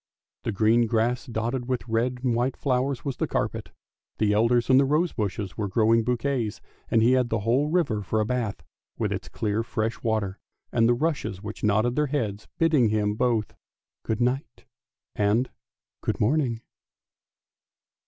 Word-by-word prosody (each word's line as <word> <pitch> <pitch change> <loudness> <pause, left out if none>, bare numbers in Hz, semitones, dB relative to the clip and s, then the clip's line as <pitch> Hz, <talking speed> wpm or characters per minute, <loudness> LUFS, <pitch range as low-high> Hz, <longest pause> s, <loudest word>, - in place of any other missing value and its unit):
The - - 0
green 110 +3 +3
grass 120 +3 0
dotted 120 +2 -2
with 125 -1 -2
red 120 +2 0
and 125 -2 +2
white 125 +3 0
flowers 130 -1 0
was 135 -3 -3
the - - -1
carpet, - - -2 0.5
the 105 -1 +2
elders 115 +3 +3
and 130 0 +6
the - - +5
rose 155 +5 +1
bushes 100 -3 -3
were 105 - 0
growing 115 +3 +3
bouquets, 120 -2 -1 0.3
and 115 -1 +3
he 120 - +5
had 130 -2 +3
the 115 -2 0
whole 125 +7 +2
river 155 -11 +1
for 110 +3 -1
a 110 - +1
bath, 115 -3 -2 0.3
with - - -1
its - - -4
clear 105 0 -1
fresh 115 -1 -2
water, 110 -4 -1 0.3
and 115 0 +3
the 120 - +4
rushes 140 - -2
which 105 0 -7
nodded 110 +3 +2
their 150 0 +2
heads 110 -8 -2
bidding 155 -8 +4
him 105 -1 +1
both 115 -1 0 0.3
" - - -67
Good 110 +1 -2
night 125 +3 -1 0.3
" - - -64
and 115 +5 +2 0.2
" - - -67
Good - - -1
morning." 120 -1 +1
115 Hz, 175 wpm, -26 LUFS, 110-130 Hz, 0.5 s, and